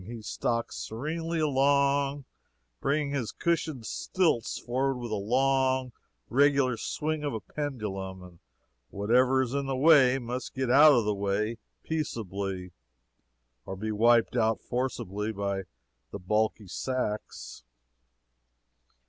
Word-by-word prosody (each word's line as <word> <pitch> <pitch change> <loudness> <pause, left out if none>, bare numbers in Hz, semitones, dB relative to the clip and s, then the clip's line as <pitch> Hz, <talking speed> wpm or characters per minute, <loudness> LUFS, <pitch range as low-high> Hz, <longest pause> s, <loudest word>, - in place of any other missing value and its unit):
He 115 -1 -8
stalks 115 +2 -2
serenely 160 +8 -3
along, 140 -1 +2 0.5
bringing 145 0 0
his 135 -6 -2
cushioned 160 -7 -1
stilts 165 -8 0
forward 130 +2 -1
with 120 -2 -6
the - - 0
long, 130 +4 +1 0.4
regular 140 0 +3
swing 150 +6 -3
of 145 -5 -2
a - - -2
pendulum, 100 -10 -5
and 90 -2 -14 0.5
whatever 125 +6 +3
is 125 0 -5
in 140 -1 -1
the 135 - -1
way 135 -2 +6
must 125 +1 -5
get 130 -2 0
out 145 +3 +8
of 120 -5 +2
the 105 - +1
way 100 +3 -1 0.2
peaceably, 100 - -4 0.9
or 95 - -6
be 110 +3 -4
wiped 115 +2 +3
out 110 -2 +2
forcibly 110 -4 -3
by 100 -2 -3 0.4
the - - -6
bulky 105 +3 0
sacks. 110 0 -4
125 Hz, 125 wpm, -28 LUFS, 105-140 Hz, 0.9 s, out